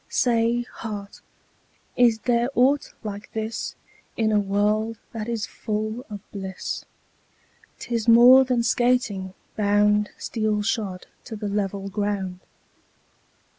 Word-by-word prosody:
Say, 235 0 +2
heart, 210 -4 -8 0.7
is 240 -3 +4
there 240 0 +2
aught 275 +4 +3
like 205 -1 -6
this 220 +1 -3 0.4
In 220 -1 +2
a 210 - +4
world 210 +3 0
that 225 -1 -5
is 230 -2 -1
full 215 +3 -4
of 205 -2 -7
bliss? 190 -2 -5 0.9
'Tis 235 -2 -3
more 245 +3 +9
than 250 -2 +1
skating, 220 -5 +1 0.2
bound 210 0 +3
15 - - -31
Steel 215 -2 -1
shod 200 -4 -2 0.2
to 230 - -6
the 210 -1 -4
level 200 -1 -2
ground. 195 -2 -2
215 Hz, 120 wpm, -24 LUFS, 205-235 Hz, 0.9 s, more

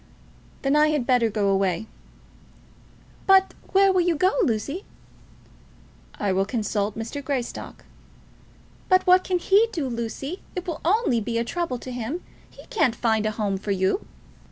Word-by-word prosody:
"Then 275 +1 +2
I 300 0 +5
had 300 -5 0
better 245 -3 +3
go 205 -2 0
away." 195 0 +1 1.4
"But 385 0 +5 0.2
where 390 0 +5
will 370 - +3
you 345 -1 +2
go, 370 +5 +3
Lucy?" 285 - -1 1.3
"I 205 -2 -1
will 190 +1 +2
consult 210 -1 -2
Mr. 230 +6 -5
Greystock." 260 -3 -4 1.0
"But 370 -1 +4
what 370 0 +6
can 365 - 0
he 395 +5 +4
do, 310 -10 -2
Lucy? 250 - -4
It 360 0 -4
will 330 -3 -4
only 360 - +2
be 230 +2 -2
a 230 - +1
trouble 335 -2 -2
to 255 - -8
him. 250 +8 -4 0.3
He - - -15
can't 255 - +2
find 220 -3 +1
a - - 0
home 200 -3 -1
for 205 - -7
you." 190 - +1
255 Hz, 155 wpm, -24 LUFS, 220-355 Hz, 1.4 s, what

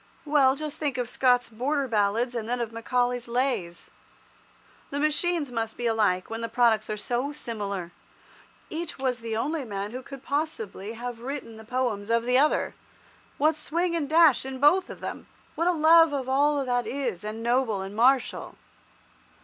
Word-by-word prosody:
Well, 280 -3 +4
just 300 0 -5
think 285 -4 -1
of 245 -1 -1
Scott's 250 0 +2
"Border 270 +5 -1
Ballads," 225 +2 +1
and 230 -2 -4
then 245 0 0
of 235 -2 -3
Macaulay's 245 +1 -1
"Lays." 235 -8 -2 1.0
The 285 - -3
machines 305 -1 0
must 225 -2 -3
be 240 - -3
alike, 210 -5 +1
when 225 +1 -5
the 230 - -3
products 230 -3 +2
are 215 - -2
so 245 +6 -2
similar. 200 - -5 0.8
Each 330 +1 -4
was 260 -2 -1
the 225 -1 -3
only 300 +5 -1
man 205 -3 -4
who 255 +2 -6
could 270 +1 -11
possibly 225 -9 -3
have 240 0 -6
written 260 -3 -6
the 220 - -11
poems 230 -4 -2
of 230 0 +2
the 250 +2 +3
other. 300 +2 +2 0.6
What 310 +2 +3
swing 340 +3 -1
and 295 -4 -2
dash 315 -4 +5
in 265 0 -6
both 355 +7 +4
of - - -9
them! - - -6 0.3
What 335 +2 0
a - - +5
love 325 -1 +6
of 265 -2 -2
all 285 +1 +2
that 245 -1 0
is 245 -10 -3
manly 215 +1 -5
and 225 - -7
noble 235 -5 +1
and 195 +2 -8
martial! 255 +4 +2
250 Hz, 180 wpm, -26 LUFS, 225-285 Hz, 1.0 s, love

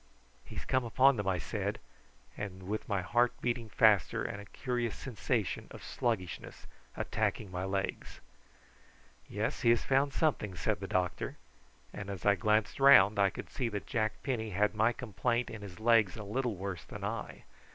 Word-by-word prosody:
"He - - -11
has - - -5
come 130 0 +1
upon 130 +3 +4
them," 105 -1 -2
I 95 -1 +2
said, 85 - -3 0.6
with 100 +1 -5
my 100 -3 0
heart 120 +5 +2
beating 120 -2 -2
faster - - +4
and 100 - -4
a - - -11
curious 120 -1 -2
sensation 115 -3 -2
of - - -11
sluggishness 110 -8 -3 0.3
attacking 100 -4 -1
my 90 +1 -3
legs. 95 0 -3 1.1
"Yes, - - -2
he 115 - +4
has 120 -1 +4
found 135 +1 +2
something," 135 - 0
said 80 - -1
the - - -5
doctor; 90 -1 -1 0.6
and 100 -1 -6
as 100 -3 -6
I 100 - +6
glanced 105 +5 +1
round 110 -7 +7
I 100 -1 +5
could - - -8
see 125 -4 -1
that 105 -2 -4
Jack 110 -4 0
Penny 115 -5 -2
had 105 +2 +1
my 110 +2 +3
complaint 120 0 -1
in 110 - -7
his 95 -4 -9
legs 115 -3 +4
a 110 - -6
little 120 +2 -1
worse 95 -1 -5
than - - -9
I. - - -4
110 Hz, 170 wpm, -32 LUFS, 100-120 Hz, 1.1 s, round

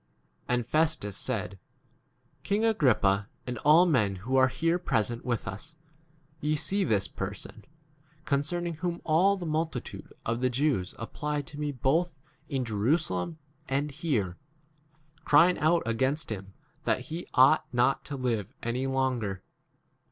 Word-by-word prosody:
24 - - 0
And 120 -2 -2
Festus 155 -11 +1
said, 105 -1 -2
g 100 - -13 0.8
King 210 +3 +1
Agrippa, 110 - +3 0.2
and 125 -2 -4
all 155 +5 +6
men 115 - +2
who 115 +8 -3
are 130 0 +6
here 165 +6 0
present 120 -7 0
with 120 -6 -2
us, 105 +12 -7 0.6
ye 155 0 0
see 195 +7 0
this 100 - +1
person, 100 +2 -6 0.6
con 140 - +2
cerning 170 +2 -3
whom 175 0 -2
all 185 +6 +3
the 180 - -5
multitude 155 -4 -3
of 115 +2 -1
the 130 - +3
Jews 125 - 0
applied 150 +5 -3
to 145 +2 -10
me 150 -1 -1
both 140 +7 +1 0.4
in 135 -4 -1
Jerusalem 115 - 0 0.3
and 140 +2 0
here, 130 - -1 0.9
crying 170 +5 +5
out 165 +3 +3
against 130 +5 0
[him] 95 -2 -6 0.3
that - - +1
he 165 +3 -6
ought 130 +4 +5
not 125 +2 +2
to 145 - -5
25 130 - -5
live 105 +4 -8
any 125 +3 -1
longer. 125 -8 -1
135 Hz, 150 wpm, -29 LUFS, 115-160 Hz, 0.9 s, all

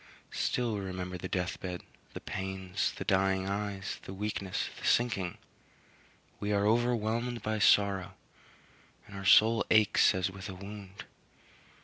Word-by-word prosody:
Still 120 -3 0
we 105 - -2
remember 90 -1 -5
the - - -4
death 90 +1 -2
bed, 90 -1 -5 0.3
the - - -4
pains, 95 +1 -3
the - - -4
dying 95 -1 +2
eyes, 100 -1 -3
the 95 - -8
weakness, 100 -2 -2
the - - -12
sinking 105 -7 +1 1.0
we 105 - -2
are 100 0 +2
overwhelmed 115 0 +1
by 110 0 -1
sorrow, 100 -2 +3 0.9
and 100 - -12
our 100 0 -6
souls 110 +4 +6
ache 110 -1 +4
as 95 +1 -1
with 95 +1 -8
a 95 - -6
wound. 100 0 -9
100 Hz, 140 wpm, -31 LUFS, 95-105 Hz, 1.0 s, souls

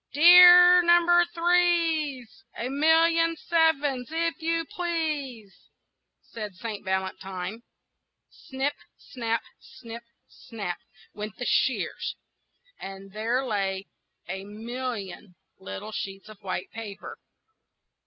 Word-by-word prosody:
"Dear 355 +3 +9
Number 345 0 +5
Threes, 335 -8 0
A 240 - -3
million 330 +3 +3
sevens, 295 -7 +1
if 330 0 -2
you 330 0 -1
please!" 300 - -4 0.7
said 210 -4 -8
Saint 220 0 -6
Valentine. 190 +2 -4 0.7
Snip 270 +2 -4 0.2
snap! 230 -2 -3 0.2
snip 235 -3 -11 0.3
snap! 200 -6 -7 0.3
went 210 -1 -7
the 245 - -5
shears, 260 - -1 0.6
and 195 0 -9
there 230 +6 -1
lay 195 -4 -2 0.4
a 190 0 -5
million 215 -3 -7 0.2
little 95 - -8
sheets 195 0 -6
of 215 -1 -14
white 185 -2 -5
paper. 215 -3 -9
250 Hz, 95 wpm, -26 LUFS, 205-330 Hz, 0.7 s, Dear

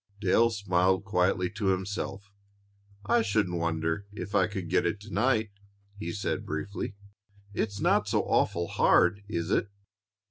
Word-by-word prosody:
Dale 110 +4 +4
smiled 95 -2 +1
quietly 90 -2 +1
to 105 -1 -3
himself. 95 +1 -2 0.7
"I 240 0 +3
shouldn't 95 - 0
wonder 80 +3 -1
if 100 -1 -7
I 95 -3 +4
could 95 -4 -5
get 90 - +2
it 85 +4 -1
to 105 0 -10
night," 110 -1 +2 0.4
he 100 -4 -5
said 100 +3 -2
briefly. 100 +6 -4 0.6
"It's 100 -1 -2
not - - +2
so - - +1
awful 85 0 +1
hard, 90 +3 +3
is 85 -3 -2
it?" 100 - +1
100 Hz, 145 wpm, -28 LUFS, 90-105 Hz, 0.7 s, Dale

